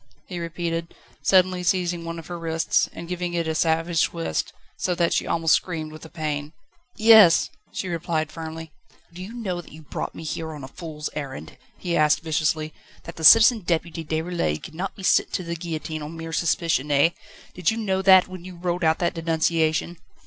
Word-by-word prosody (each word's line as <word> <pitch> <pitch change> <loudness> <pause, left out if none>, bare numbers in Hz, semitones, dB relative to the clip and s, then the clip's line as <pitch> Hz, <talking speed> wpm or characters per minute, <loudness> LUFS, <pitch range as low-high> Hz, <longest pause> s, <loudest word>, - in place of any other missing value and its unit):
he 180 -2 -6
repeated, 165 0 -4 0.3
suddenly 185 -1 +3
seizing 175 -1 0
one 165 0 -5
of 165 - -8
her 175 -1 -6
wrists, 165 0 +1
and 170 - -9
giving 175 0 -3
it 170 -1 -1
a 160 - 0
savage 165 +1 +2
twist, 80 -1 -3 0.2
so 180 - -1
that 170 -1 +1
she - - 0
almost 165 -1 +2
screamed 160 -4 -1
with 155 0 -11
the 160 - -11
pain. 150 -1 -4 0.4
"Yes," 215 -6 +7 0.2
she 190 - -4
replied 165 -2 -2
firmly. 160 -1 -7 0.4
"Do 180 - -9
you 190 +4 -7
know 200 -7 -4
that - - -17
you 155 +1 -12
brought - - -5
me - - -8
here 160 0 -4
on 145 -2 -9
a - - -6
fool's 150 0 -7
errand?" 140 -3 -7 0.2
he 175 -2 -2
asked 155 0 +3
viciously; 155 -1 -1 0.3
"that 165 - -9
the 160 - -7
Citizen 225 +7 +8
Deputy 170 -2 -2
Déroulède 160 - -2
cannot 185 +4 -5
be 195 - -11
sent - - +3
to 185 - -1
the 170 0 -4
guillotine 160 -2 -5
on 155 +2 -7
mere 165 0 -6
suspicion, 165 -3 0
eh? 145 +3 +4 0.4
Did 180 -2 +1
you 225 - -1
know 190 -4 0
that, 190 -1 +7
when 185 -2 -9
you 185 0 -9
wrote 175 0 -2
out 160 0 +3
that 175 0 0
denunciation?" 165 0 0
165 Hz, 195 wpm, -24 LUFS, 160-180 Hz, 0.4 s, Citizen